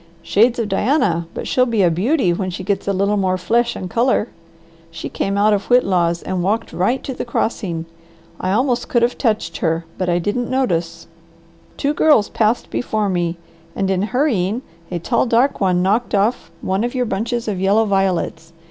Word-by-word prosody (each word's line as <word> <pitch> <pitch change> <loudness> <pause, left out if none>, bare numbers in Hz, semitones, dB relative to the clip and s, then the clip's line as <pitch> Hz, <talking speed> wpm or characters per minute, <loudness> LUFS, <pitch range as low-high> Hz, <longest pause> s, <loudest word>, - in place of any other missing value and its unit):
"Shades 230 +4 +3
of 230 -3 -1
Diana, 195 - +1
but - - -5
she'll 255 0 +2
be 225 -4 +1
a 175 - +4
beauty 195 - +1
when 185 +2 -2
she 185 +1 -6
gets 200 +1 -2
a - - +2
little 200 +2 +1
more 185 -2 +1
flesh 235 +6 +1
and 185 - -5
colour. 235 +2 +1 0.6
She 165 -1 -7
came 195 0 -2
out 210 +1 +4
of 200 -1 -1
Whitlaw's 180 -8 +2
and 185 -1 -2
walked 215 +5 -1
right 240 +9 0
to 265 - -4
the - - -4
crossing. 195 -8 -2 0.5
I 185 - -1
almost 245 +3 +1
could 240 -1 +2
have 240 - +1
touched 220 -5 -1
her, 165 0 -1
but 185 -1 0
I 175 - +2
didn't 205 +7 -2
notice. 170 -10 -1 0.7
Two 285 +1 0
girls 295 -9 +4
passed 220 +2 0
before 215 -4 -1
me, 175 -2 -1 0.4
and 195 -1 0
in 185 -1 +1
hurrying, 225 -2 0 0.3
a 175 - -3
tall, 235 +8 0
dark 240 +3 +2
one 180 -2 +2
knocked 210 +4 +1
off 205 +5 0
one 190 +3 0
of 245 +2 -3
your 250 -1 +1
bunches 230 +2 -2
of 200 -4 -2
yellow 205 +4 +3
violets. 190 -4 -1
205 Hz, 190 wpm, -19 LUFS, 185-235 Hz, 0.7 s, a